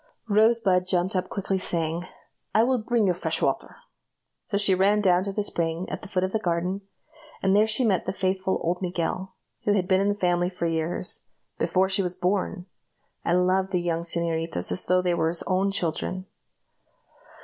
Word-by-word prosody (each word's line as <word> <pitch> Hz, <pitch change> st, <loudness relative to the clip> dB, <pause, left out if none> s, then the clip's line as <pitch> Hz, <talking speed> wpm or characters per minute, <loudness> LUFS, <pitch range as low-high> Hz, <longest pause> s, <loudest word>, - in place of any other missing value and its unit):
Rosebud 210 Hz, -4 st, +3 dB
jumped 185 Hz, +1 st, +1 dB
up 185 Hz, -, -1 dB
quickly, 195 Hz, -1 st, -2 dB
saying, 170 Hz, -1 st, -1 dB, 0.5 s
"I 220 Hz, -, +6 dB
will 255 Hz, +1 st, +2 dB
bring 230 Hz, 0 st, +1 dB
you 185 Hz, -, +3 dB
fresh 175 Hz, -, 0 dB
water;" -, -, -1 dB, 0.7 s
so 200 Hz, -, -1 dB
she 200 Hz, -1 st, +3 dB
ran 195 Hz, +3 st, +3 dB
down 185 Hz, -3 st, +3 dB
to 200 Hz, -, -2 dB
the 210 Hz, +1 st, -1 dB
spring 170 Hz, -2 st, -2 dB
at -, -, -4 dB
the -, -, -9 dB
foot 185 Hz, -2 st, -1 dB
of 185 Hz, -, -1 dB
the 220 Hz, -, 0 dB
garden, 180 Hz, +1 st, -1 dB, 0.6 s
and 195 Hz, 0 st, +3 dB
there 210 Hz, +1 st, +5 dB
she 220 Hz, +3 st, +2 dB
met 195 Hz, -5 st, +1 dB
the -, -, +1 dB
faithful 190 Hz, 0 st, -1 dB
old 175 Hz, +2 st, -1 dB
Miguel 185 Hz, +1 st, -3 dB, 0.3 s
who 205 Hz, -, +2 dB
had 185 Hz, -3 st, +1 dB
been 190 Hz, -1 st, +3 dB
in 200 Hz, -, +2 dB
the 205 Hz, -, +1 dB
family 175 Hz, -2 st, +1 dB
for 180 Hz, -2 st, -4 dB
years 165 Hz, +2 st, -2 dB, 0.3 s
before 190 Hz, +1 st, +2 dB
she 195 Hz, +1 st, +2 dB
was 180 Hz, -1 st, -2 dB
born, 185 Hz, 0 st, -1 dB, 0.6 s
and 180 Hz, +1 st, +2 dB
loved 190 Hz, +1 st, +1 dB
the 180 Hz, -, +1 dB
young 170 Hz, -1 st, -1 dB
señoritas 165 Hz, -, -1 dB
as 90 Hz, -, -1 dB
though 180 Hz, 0 st, +3 dB
they 180 Hz, -1 st, +2 dB
were 160 Hz, -1 st, +1 dB
his 165 Hz, +1 st, -2 dB
own 190 Hz, +2 st, +1 dB
children. 185 Hz, 0 st, -1 dB
185 Hz, 195 wpm, -26 LUFS, 175-200 Hz, 0.7 s, I